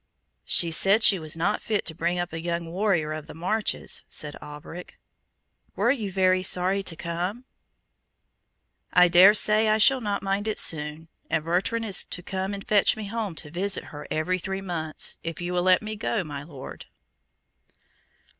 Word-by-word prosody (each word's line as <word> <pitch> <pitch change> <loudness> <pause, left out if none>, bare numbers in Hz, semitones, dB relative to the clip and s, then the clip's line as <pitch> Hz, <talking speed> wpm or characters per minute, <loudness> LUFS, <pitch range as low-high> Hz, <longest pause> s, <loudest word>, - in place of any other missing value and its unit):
"She 170 -1 +5
said 195 +7 +4
she 195 -3 +6
was 155 0 -2
not 165 - 0
fit 215 -3 -2
to 160 - -2
bring 170 +2 -2
up 175 -1 -3
a 165 - -5
young 170 -1 -4
warrior 175 -5 0
of 155 -1 -7
the - - -11
marches," 195 +6 -2
said 150 -1 -2
Alberic. 150 +4 -10 0.8
"Were 240 - +2
you 220 -8 -3
very 185 0 +2
sorry 185 +1 +2
to 180 -3 -3
come?" 175 +9 -4 1.5
"I 180 0 +6
dare 180 +4 +7
say 215 +1 +4
I 215 - +3
shall 260 +4 +4
not 205 -3 -2
mind 195 +2 -1
it 215 - -2
soon; 155 0 0 0.2
and 160 -1 -1
Bertrand 195 +7 0
is 200 -4 +2
to 180 - -8
come 190 +2 -4
and 195 - -10
fetch 210 0 +3
me 210 -2 -6
home 215 -5 -4
to 150 -2 -5
visit 190 +3 -1
her 145 0 -9
every 180 +4 -1
three 190 +2 -4
months, 165 -5 -4
if 165 -2 -5
you 175 0 -4
will 180 - +1
let 185 +2 +3
me 215 0 -5
go, 215 -1 -2
my 145 -3 -7
Lord." 145 -3 -11
180 Hz, 180 wpm, -25 LUFS, 165-205 Hz, 1.5 s, dare